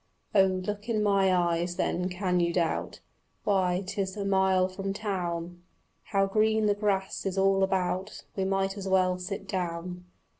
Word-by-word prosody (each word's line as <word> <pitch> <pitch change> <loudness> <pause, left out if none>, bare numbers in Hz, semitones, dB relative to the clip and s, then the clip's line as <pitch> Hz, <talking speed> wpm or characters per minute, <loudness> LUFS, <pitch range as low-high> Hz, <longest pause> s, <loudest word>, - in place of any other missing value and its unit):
Oh, 195 -2 +6
look 205 +4 -3
in 215 -2 +1
my 195 -2 +3
eyes, 175 -1 +1
then, 180 -1 -1
can 180 -1 0
you 170 0 +2
doubt? 170 -2 -1 0.4
Why, 190 -2 +1
'tis 195 0 -3
a 200 - -2
mile 190 -1 +3
from 195 +1 -4
town. 175 -4 -3 0.4
How 195 -2 +2
green 220 +2 +2
the 205 - +4
grass 200 -2 -1
is 195 -1 -2
all 195 0 +3
about! 190 +1 -1
We 195 - 0
might 195 +1 0
as 195 -1 -5
well 185 -1 +2
sit 195 +2 -5
down. 180 -1 -4
190 Hz, 160 wpm, -28 LUFS, 180-195 Hz, 0.4 s, Oh